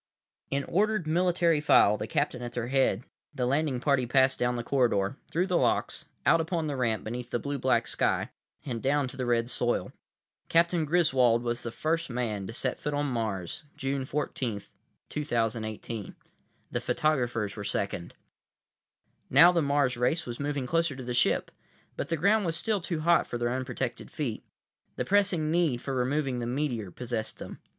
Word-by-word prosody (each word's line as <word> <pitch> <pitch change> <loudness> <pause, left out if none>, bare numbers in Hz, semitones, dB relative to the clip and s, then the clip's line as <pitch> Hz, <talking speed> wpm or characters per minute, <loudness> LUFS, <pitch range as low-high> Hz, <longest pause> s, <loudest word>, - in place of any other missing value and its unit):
———— - - -66
In 140 0 0
ordered, 210 +1 +1
military 170 -1 +2
file, 105 -7 +5
the 105 - -4
captain 125 - -1
at 120 -1 -6
their 120 0 -3
head, 130 -5 +2 0.3
the 125 -3 0
landing 140 0 +1
party 130 -2 +2
passed 130 +1 +3
down 125 0 +1
the 120 - -3
corridor, 120 -5 +1
through 175 +3 +1
the 180 -2 +1
locks, - - 0 0.2
out 165 - +5
upon 165 0 -1
the 145 -2 -2
ramp 115 -4 0
beneath 120 +2 -5
the - - 0
blue 140 +3 -3
black 120 -2 +2
sky; - - 0 0.3
and 120 -5 -3
down 140 0 +1
to - - -10
the 130 -2 -3
red 120 -1 +2
soil. 120 -1 -1 0.6
Captain 170 -1 +3
Griswold 130 -8 +3
was 120 0 -1
the 120 - -4
first 165 +6 -1
man 110 -5 -2
to - - -5
set 125 +1 -1
foot 150 -1 -2
on 145 0 0
Mars, 105 - -3
June 135 0 -1
14, 130 -6 -3 0.5
2018. 115 -5 -3 0.6
The - - -1
photographers 120 -9 0
were 105 - -6
second. 100 -3 -3 1.1
Now 165 +7 +8
the 170 -2 +2
Mars 140 -3 +1
race 155 +8 +1
was 120 -1 -6
moving 145 -2 -2
closer 165 0 +1
to 130 - -7
the 125 0 -3
ship, 120 - +2 0.4
but - - -4
the 165 - 0
ground 205 +6 +3
was 165 -1 -1
still 215 -4 0
too 170 -2 -3
hot 170 +1 +3
for 120 - -3
their 120 0 0
unprotected 130 -1 -3
feet. 125 -8 -4 0.5
The - - -2
pressing 185 -6 +2
need 165 -7 +2
for 135 +2 -4
removing 130 0 0
the 120 - -3
meteor 120 -6 -2
possessed 115 +2 -4
them. - - -9
130 Hz, 180 wpm, -28 LUFS, 120-155 Hz, 1.1 s, Now